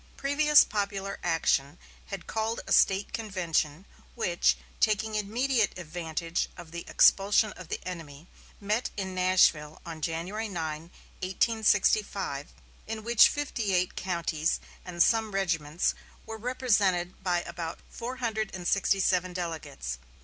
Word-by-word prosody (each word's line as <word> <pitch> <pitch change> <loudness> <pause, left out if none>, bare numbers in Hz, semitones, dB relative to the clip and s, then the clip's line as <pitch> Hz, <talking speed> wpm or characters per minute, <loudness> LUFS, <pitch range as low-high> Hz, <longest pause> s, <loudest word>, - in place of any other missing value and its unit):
Previous 300 +2 +5
popular 200 -1 -3
action 160 -3 +1 0.3
had 195 -4 -6
called 225 +1 -2
a - - -8
State 195 +1 +3
convention, 180 -6 -1 0.3
which, 180 -7 +2 0.2
taking 215 0 +1
immediate 220 +2 0
advantage 165 -1 -3
of 170 -2 -11
the 170 0 -6
expulsion 205 +2 +4
of 180 - -11
the - - -3
enemy, 160 -4 -8 0.3
met 210 +4 -1
in 190 -2 -3
Nashville 180 -5 +3
on 165 -2 -7
January 180 +8 -3
9, 160 -3 -4 0.3
1865, 200 -5 +1 0.4
in 220 0 -5
which 235 0 +6
fifty 235 -9 -1
eight 180 0 0
counties 170 -3 -1 0.2
and 175 -2 +2
some 220 -2 +1
regiments 165 -4 0 0.3
were 225 - -6
represented 205 -8 +1
by 175 -2 +1
about 170 -1 -5
four 245 +2 -5
hundred 220 -4 -2
and 180 -1 -5
sixty 200 0 +2
seven 185 -1 +1
delegates. 160 - -5
185 Hz, 130 wpm, -28 LUFS, 170-215 Hz, 0.4 s, which